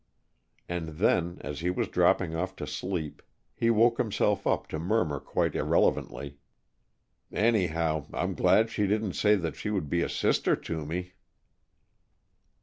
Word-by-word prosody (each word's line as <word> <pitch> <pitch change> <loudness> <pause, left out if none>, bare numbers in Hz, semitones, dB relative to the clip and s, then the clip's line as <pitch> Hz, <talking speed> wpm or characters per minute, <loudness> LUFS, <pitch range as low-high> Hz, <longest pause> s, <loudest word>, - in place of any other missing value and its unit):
And 80 -3 -4
then, 85 -2 +2
as 75 0 -5
he 85 - -1
was 90 - -1
dropping 80 - +2
off 90 +3 -3
to 75 - -5
sleep, 80 0 -4 0.3
he 115 - +1
woke 115 +2 +4
himself 110 -5 +1
up - - +1
to 80 - -4
murmur 85 -5 0
quite - - -1
irrelevantly, 70 +3 0 0.9
"Anyhow, 85 -9 +1
I'm - - -2
glad 110 +1 +3
she 105 -2 0
didn't 105 -1 0
say 105 0 +4
that 85 -6 -3
she - - -4
would 95 -9 -2
be 85 - +2
a - - -1
sister - - +2
to 80 -2 -5
me!" 90 +3 -4
90 Hz, 145 wpm, -28 LUFS, 80-105 Hz, 0.9 s, woke